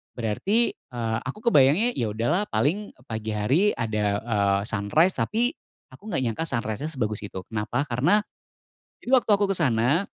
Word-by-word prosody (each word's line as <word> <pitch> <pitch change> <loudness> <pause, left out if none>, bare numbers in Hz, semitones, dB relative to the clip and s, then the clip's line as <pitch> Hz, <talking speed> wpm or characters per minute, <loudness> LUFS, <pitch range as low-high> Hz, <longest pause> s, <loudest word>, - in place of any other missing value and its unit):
berarti, 190 - +1
eee, 115 -2 -4
aku 135 +11 -5
kebayangnya 150 - +4
ya 115 - 0
udah 115 +2 -2
lah 190 +4 +2
paling 200 +7 -1 0.2
pagi 110 0 -4
hari 115 - +2
ada, 105 -3 -1
eee, 100 -4 +1
sunrise 115 - +2
tapi 235 +3 +1 0.4
aku 205 - -16
enggak 135 -7 0
nyangka 120 +7 -2
sunrise-nya 115 0 -2
sebagus 110 -7 -2
itu. 95 -2 -7
Kenapa? 110 +4 -2
Karena. 145 - +3 0.8
Jadi 245 - -5
waktu 250 -4 +4
aku 205 0 +1
ke - - 0
sana 140 - +2
120 Hz, 160 wpm, -25 LUFS, 110-175 Hz, 0.8 s, kebayangnya